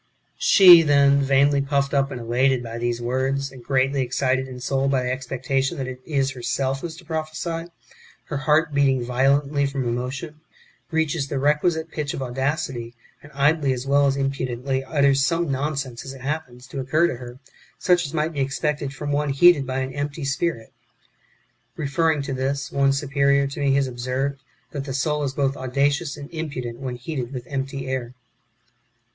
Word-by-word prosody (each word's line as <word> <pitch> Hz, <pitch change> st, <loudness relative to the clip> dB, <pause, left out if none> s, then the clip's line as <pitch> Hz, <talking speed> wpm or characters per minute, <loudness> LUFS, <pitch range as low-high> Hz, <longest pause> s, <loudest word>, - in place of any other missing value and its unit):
She 190 Hz, -, +9 dB
then, 140 Hz, -2 st, +4 dB
vainly 140 Hz, +1 st, +3 dB
puffed 140 Hz, 0 st, 0 dB
up 135 Hz, -1 st, +2 dB
and 130 Hz, -, -6 dB
elated 125 Hz, +2 st, +1 dB
by 115 Hz, 0 st, -6 dB
these 120 Hz, 0 st, -1 dB
words, 130 Hz, +3 st, -1 dB
and 130 Hz, -3 st, -13 dB
greatly 135 Hz, +1 st, +1 dB
excited 130 Hz, +1 st, 0 dB
in 125 Hz, -1 st, -8 dB
soul 135 Hz, +2 st, 0 dB
by 135 Hz, -2 st, +1 dB
the 125 Hz, -, -1 dB
expectation 135 Hz, +3 st, -2 dB
that 135 Hz, -, -3 dB
it 130 Hz, 0 st, -7 dB
is 135 Hz, -4 st, +1 dB
herself 130 Hz, +2 st, -2 dB
who -, -, -3 dB
is 160 Hz, -, -9 dB
to 175 Hz, -, -14 dB
prophesy, 160 Hz, +1 st, -4 dB, 0.6 s
her 150 Hz, -, -4 dB
heart 150 Hz, +3 st, +2 dB
beating 135 Hz, -3 st, +2 dB
violently 140 Hz, +3 st, +2 dB
[from 135 Hz, -2 st, -3 dB
emotion], 130 Hz, +6 st, -4 dB, 0.5 s
reaches 160 Hz, -3 st, 0 dB
the 140 Hz, -, -3 dB
requisite 160 Hz, +4 st, +1 dB
pitch 150 Hz, -3 st, -3 dB
of -, -, -5 dB
audacity, 130 Hz, -2 st, -3 dB, 0.3 s
and 145 Hz, -, -15 dB
idly 140 Hz, 0 st, +2 dB
as 125 Hz, +1 st, -5 dB
well 140 Hz, +1 st, +4 dB
as 135 Hz, 0 st, +1 dB
impudently 135 Hz, -1 st, -2 dB
utters 140 Hz, -1 st, +3 dB
some 165 Hz, +1 st, +1 dB
non 140 Hz, +2 st, -1 dB
sense 130 Hz, -4 st, -5 dB
as 135 Hz, 0 st, -8 dB
it 130 Hz, -, -12 dB
happens 135 Hz, -3 st, -4 dB
to 135 Hz, -, -7 dB
occur 155 Hz, +6 st, +2 dB
to 170 Hz, -8 st, -1 dB
her, 120 Hz, 0 st, -9 dB, 0.4 s
such 180 Hz, -1 st, +3 dB
as 140 Hz, -, -5 dB
might 155 Hz, +1 st, -1 dB
be 145 Hz, -, -4 dB
expected 140 Hz, +1 st, -2 dB
from 145 Hz, +1 st, -4 dB
one 145 Hz, 0 st, 0 dB
heated 140 Hz, 0 st, +5 dB
by 130 Hz, 0 st, -1 dB
an 130 Hz, 0 st, -4 dB
empty 145 Hz, +1 st, -4 dB
spirit. 140 Hz, -4 st, -2 dB, 1.0 s
(Referring 155 Hz, 0 st, 0 dB
to 135 Hz, -, -4 dB
this, 135 Hz, +1 st, -2 dB
one 140 Hz, 0 st, +3 dB
superior 140 Hz, 0 st, +2 dB
to 140 Hz, +1 st, -6 dB
me 140 Hz, -1 st, +2 dB
has 140 Hz, 0 st, +3 dB
observed, 130 Hz, +3 st, -3 dB, 0.3 s
that 140 Hz, -2 st, -4 dB
the 135 Hz, -2 st, -4 dB
soul 150 Hz, +2 st, 0 dB
is 135 Hz, -2 st, -2 dB
both 135 Hz, 0 st, 0 dB
audacious 140 Hz, +3 st, 0 dB
and 140 Hz, -, -8 dB
impudent 140 Hz, -7 st, -5 dB
wdien 125 Hz, -2 st, -4 dB
heated 125 Hz, -1 st, -5 dB
with 125 Hz, -3 st, -6 dB
empty 135 Hz, 0 st, -4 dB
air.) 130 Hz, -2 st, -3 dB
140 Hz, 185 wpm, -23 LUFS, 130-145 Hz, 1.0 s, She